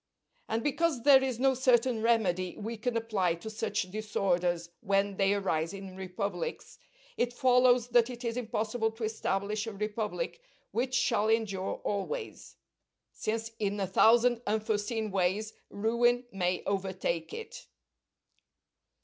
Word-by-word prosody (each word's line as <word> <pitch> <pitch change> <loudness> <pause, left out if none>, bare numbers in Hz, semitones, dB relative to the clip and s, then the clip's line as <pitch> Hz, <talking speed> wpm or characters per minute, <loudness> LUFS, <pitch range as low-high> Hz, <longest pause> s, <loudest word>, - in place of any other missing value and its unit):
And 225 +1 -1
because 295 -3 0
there 270 -1 +7
is 255 -3 -2
no 265 +1 +4
certain 250 -2 +2
remedy 190 -6 +1
we 225 +2 -4
can 230 +2 -2
apply 200 -7 0
to 195 +6 -8
such 210 -3 -2
disorders 180 -5 -1
when 195 0 0
they 195 +1 +3
arise 175 -3 -1
in 195 -1 -9
republics, 185 -1 -4 0.4
it 240 0 0
follows 250 -1 +4
that 240 0 +4
it 245 0 -7
is 230 0 -1
impossible 225 -1 -1
to 225 +1 -8
establish 210 0 -1
a 225 - -4
republic 210 - -3 0.3
which 255 +1 -1
shall 215 -3 +2
endure 215 -4 0
always; 435 - -4 0.6
since 225 +1 -3
in 205 -1 -1
a 195 - +1
thousand 230 +5 +4
unforeseen 215 +1 -1
ways 195 +3 0 0.2
ruin 240 +4 +1
may 180 -2 -1
overtake 190 -4 -2
it. 455 - -8
215 Hz, 130 wpm, -30 LUFS, 195-240 Hz, 0.6 s, there